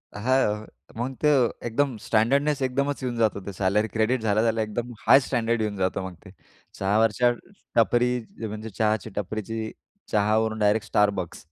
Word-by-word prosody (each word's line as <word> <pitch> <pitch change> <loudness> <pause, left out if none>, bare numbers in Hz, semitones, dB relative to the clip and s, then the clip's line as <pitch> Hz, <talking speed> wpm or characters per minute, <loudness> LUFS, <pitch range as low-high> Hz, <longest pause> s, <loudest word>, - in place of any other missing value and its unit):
हां. 110 -2 +1 0.3
मग 125 +3 -3
तर 140 -5 +4 0.2
एकदम 130 +2 0
स्टँडर्डनेस 140 +6 +2
एकदमच 140 +2 -1
येऊन 125 -1 -2
जातो 110 -2 +2
ते 100 - -6
सॅलरी 105 +3 +2
क्रेडिट 110 +3 +1
झाल्या-झाल्या 110 +1 +1
एकदम 115 +3 -4 0.2
हाय - - +9
स्टँडर्ड 115 0 0
येऊन 105 -2 -2
जातो 95 0 0
मग 95 - -9
ते. 95 - -11 0.5
चहावरच्या 110 +4 +3 0.5
टपरी 120 0 +3 0.4
म्हणजे 110 +1 -6
चहाची 110 +2 0
टपरीची 110 +2 -4 0.4
चहावरून 110 +1 +1
डायरेक्ट 105 +1 +2
Starbucks. 100 -4 +1
110 Hz, 140 wpm, -25 LUFS, 105-120 Hz, 0.5 s, हाय